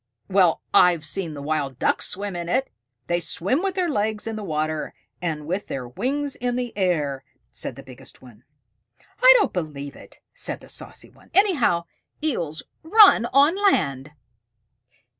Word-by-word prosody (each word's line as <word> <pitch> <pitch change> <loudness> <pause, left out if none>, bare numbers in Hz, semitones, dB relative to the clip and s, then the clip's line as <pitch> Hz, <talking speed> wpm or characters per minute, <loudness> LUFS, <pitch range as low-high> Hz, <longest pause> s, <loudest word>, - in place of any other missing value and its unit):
"Well, 185 -4 +3
I've 175 -3 +5
seen 165 -1 -4
the 140 - -7
Wild 145 -4 -2
Ducks - - +1
swim 200 0 -4
in 170 -1 -4
it! 260 +6 0 0.3
They 175 0 0
swim 185 - -1
with 385 -1 -2
their 365 -2 0
legs 215 -7 -1
in 225 -1 -4
the 215 - -6
water, 155 -3 -3 0.3
and 155 -4 -3
with 185 +6 -3
their 130 -2 -5
wings 275 - -2
in 245 0 -2
the 245 -1 -4
air," 155 -9 0 0.3
said - - -4
the - - -11
biggest - - -12
one. 120 -3 -17 0.8
"I - - +9
don't 425 - +1
believe 145 -5 -5
it," - - -15
said - - -3
the - - -16
saucy - - -7
one. - - -22
"Anyhow, 305 - +3 0.4
Eels 170 - -2 0.2
run 360 - +6
on 285 +7 +4
land." 150 - +1
185 Hz, 160 wpm, -23 LUFS, -, 0.8 s, I